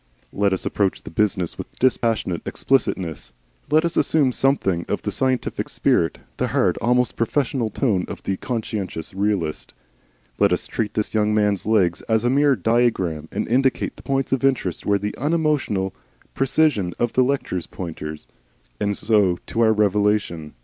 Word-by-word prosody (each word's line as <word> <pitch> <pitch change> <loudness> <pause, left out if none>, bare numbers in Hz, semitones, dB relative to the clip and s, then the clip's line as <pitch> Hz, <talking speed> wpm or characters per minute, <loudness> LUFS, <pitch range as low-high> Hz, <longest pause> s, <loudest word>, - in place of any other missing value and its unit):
Let 100 0 +2
us 95 - -2
approach 100 -2 0
the - - -9
business 95 -5 0
with - - -8
dispassionate 115 -8 +1
explicitness. 85 - -1 0.4
Let 155 +3 +4
us 170 - -2
assume 145 -5 +3
something 110 -11 +1
of - - -2
the - - -2
scientific 130 -1 -1
spirit, 80 - +1 0.2
the - - 0
hard, - - +1
almost 125 +1 +1
professorial 120 0 0
tone 105 -5 0
of - - -8
the 95 - -2
conscientious 105 -9 -4
realist. 100 -5 -2 0.6
Let 100 -2 +4
us 90 - -1
treat 110 -2 -3
this 105 - -1
young 105 -1 +2
man's 105 -2 +1
legs 95 -6 +2
as 110 0 +2
a 120 - +3
mere 140 0 +4
diagram, 110 -11 0
and - - -2
indicate 130 +2 +1
the - - -13
points 135 -1 -1
of 135 0 0
interest 125 - 0
with 100 0 +2
the 105 - -2
unemotional 145 - 0 0.4
precision 135 - +1
of 120 -1 -1
a 130 - +5
lecturer's 125 -9 -1
pointer. 80 -3 -6 0.6
And 100 -1 0
so 105 -5 +2
to 115 - -2
our 110 -1 +5
revelation. 105 -6 +1
105 Hz, 160 wpm, -22 LUFS, 95-130 Hz, 0.6 s, a